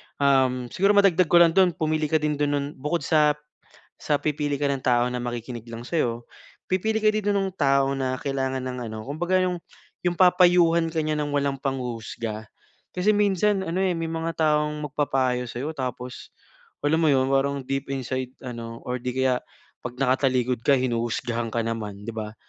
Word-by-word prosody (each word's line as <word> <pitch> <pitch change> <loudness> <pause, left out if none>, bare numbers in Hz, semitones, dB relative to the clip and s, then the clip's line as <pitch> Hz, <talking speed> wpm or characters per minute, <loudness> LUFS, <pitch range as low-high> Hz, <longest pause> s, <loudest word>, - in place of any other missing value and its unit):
um, 130 -3 +2
siguro 200 +2 +3
madagdag 185 -4 +4
ko 175 - +2
lang 170 -1 +7
do'n, 180 -1 +3
pumili 155 0 0
ka 160 - 0
din 150 -1 0
do'n, 145 - +2
no'n 145 -1 -1
bukod 150 +5 -1
sa, 150 -2 +3 0.7
sa 145 -1 +1
pipili 145 -1 -1
ka 145 - 0
ng 140 -2 -1
tao 120 -2 +3
na 125 0 -3
makikinig 120 -1 -5
lang 115 +1 -7
sa'yo, 120 -8 -1 0.4
pipili 220 +4 0
ka 215 - -1
din 210 -1 0
no'ng 195 -2 0
tao 140 -4 +2
na 130 -1 -2
kailangan 135 -1 -2
ng 130 -1 -5
ano, 110 - -6
kumbaga 175 +6 0
'yong, 180 -2 -1 0.4
'yong 175 -1 -1
papayuhan 175 -2 +5
ka 160 - -4
niya 155 - 0
ng 145 - -3
walang 140 -1 0
panghuhusga. 115 -4 -4 0.4
Kasi 195 +4 +2
minsan 205 -1 +2
ano 180 -1 -3
eh, 190 -1 +1
may 165 -1 -3
mga 165 0 -3
taong 150 -1 +1
magpapayo 130 -4 0
sa'yo 120 +6 -4
tapos, 125 -1 -6 0.5
alam 150 +2 +2
mo 165 - +3
'yon, 130 0 +2
parang 140 0 +1
deep 135 +1 -3
inside 130 -1 -4
ano, 115 -2 -7
or 125 0 -3
'di 125 +1 -2
kaya, 130 -1 +2 0.5
'pag 120 - -7
nakatalikod 130 -2 +1
ka 140 - +6
hinuhusgahan 120 -2 -1
ka 115 - +1
naman 110 -3 -4
'di 110 - -5
ba? 110 -1 -5
140 Hz, 180 wpm, -25 LUFS, 125-165 Hz, 0.7 s, lang